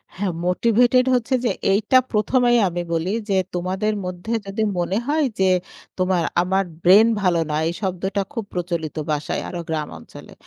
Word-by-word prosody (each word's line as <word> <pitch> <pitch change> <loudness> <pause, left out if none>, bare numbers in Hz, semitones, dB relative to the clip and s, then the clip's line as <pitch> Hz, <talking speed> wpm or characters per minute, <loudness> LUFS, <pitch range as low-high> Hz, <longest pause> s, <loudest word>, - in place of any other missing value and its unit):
হ্যাঁ, 195 0 -1 0.2
মোটিভেটেড 235 +6 +3
হচ্ছে 250 +2 0
যে, - - +2 0.2
এইটা 215 +6 +3
প্রথমেই 240 +3 +3
আমি 175 0 -3
বলি 165 +3 -1 0.2
যে 195 - +2 0.2
তোমাদের 190 +4 -1
মধ্যে 180 +5 -5
যদি 200 +3 -2 0.2
মনে 180 +3 0
হয় 300 +1 +2
যে 190 -1 +4 0.5
তোমার 185 -2 +1 0.2
আমার 190 +2 +1 0.2
ব্রেইন 200 +6 +7
ভালো 175 -3 +2
না, 150 - -1
এই 165 - -1
শব্দটা 190 +1 -2
খুব 230 - -3
প্রচলিত 170 -3 -3
বাসায় 150 -1 -2
আরো 175 - -5
গ্রাম 155 -2 -2
অঞ্চলে। 80 - -13
190 Hz, 160 wpm, -21 LUFS, 175-220 Hz, 0.5 s, ব্রেইন